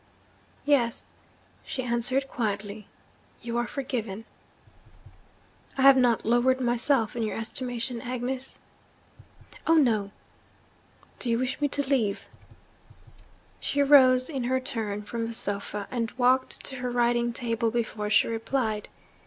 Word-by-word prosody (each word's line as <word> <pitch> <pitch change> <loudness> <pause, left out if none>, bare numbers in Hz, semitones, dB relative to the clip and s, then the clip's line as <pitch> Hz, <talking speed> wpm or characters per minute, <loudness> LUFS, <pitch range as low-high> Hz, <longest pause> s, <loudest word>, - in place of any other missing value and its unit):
'Yes,' 255 -6 +2 0.6
she 260 - -4
answered 250 +3 0
quietly, 210 -4 -3 0.6
'you 235 0 -4
are 240 - -1
forgiven.' 230 -6 -4 1.5
'I - - 0
have 275 0 +9
not 245 -3 +2
lowered 240 +3 +3
myself 240 -1 +1
in 235 - -2
your 220 - -2
estimation, 240 +1 -3
Agnes?' 255 +1 -4 1.1
'Oh, 330 - +5
no!' 225 -10 +3 1.1
'Do 245 - 0
you 230 - +2
wish 255 +4 -2
me 290 - +3
to 285 0 -2
leave 230 -8 0
you?' - - -24 1.0
She 285 0 0
rose, 255 -3 +6
in 270 -6 -3
her 260 +1 +1
turn, 220 -5 -3
from 230 +2 -4
the 230 - -5
sofa, 205 -1 -2
and 230 -3 -1
walked 255 +1 +1
to 265 - -3
her 250 0 -3
writing 240 0 +1
table 230 -1 -1
before 220 -2 -2
she 210 - +4
replied. 225 -1 -2
240 Hz, 130 wpm, -27 LUFS, 225-260 Hz, 1.5 s, have